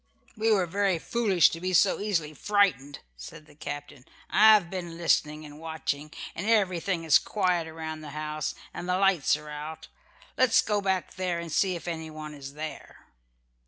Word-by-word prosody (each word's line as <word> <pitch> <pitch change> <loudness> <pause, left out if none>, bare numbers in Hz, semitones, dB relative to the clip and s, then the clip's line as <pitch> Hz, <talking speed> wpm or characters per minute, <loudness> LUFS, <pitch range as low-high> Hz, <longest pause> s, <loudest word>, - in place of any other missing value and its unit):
"We 220 0 +1
were 195 -4 +3
very 195 +1 +1
foolish 200 -1 +3
to 165 - -6
be 185 0 -2
so 190 +3 +4
easily 170 -8 -1
frightened," 165 -7 +1 0.2
said 150 - -10
the 150 - -18
captain. 145 -2 -8 0.3
"I 220 +1 +7
have 195 -5 +1
been 175 -2 -6
listening 155 -2 +1
and 150 0 -11
watching, 155 -2 -4 0.2
and 190 +5 -5
everything 185 -5 +1
is 160 -3 +6
quiet 180 -5 0
around 160 -1 -6
the 150 - -8
house 150 0 -4 0.2
and 175 - -6
the 180 - +2
lights 195 -6 +3
are 150 0 -11
out. 150 +2 -7 0.5
Let 255 -1 +5
us - - +5
go 210 -1 0
back 190 -2 -1
there 180 -2 -1
and 170 -1 -6
see 185 +3 +2
if 170 - -8
anyone 155 -2 -6
is 140 -1 -9
there." 155 +1 -8
165 Hz, 180 wpm, -27 LUFS, 150-190 Hz, 0.5 s, I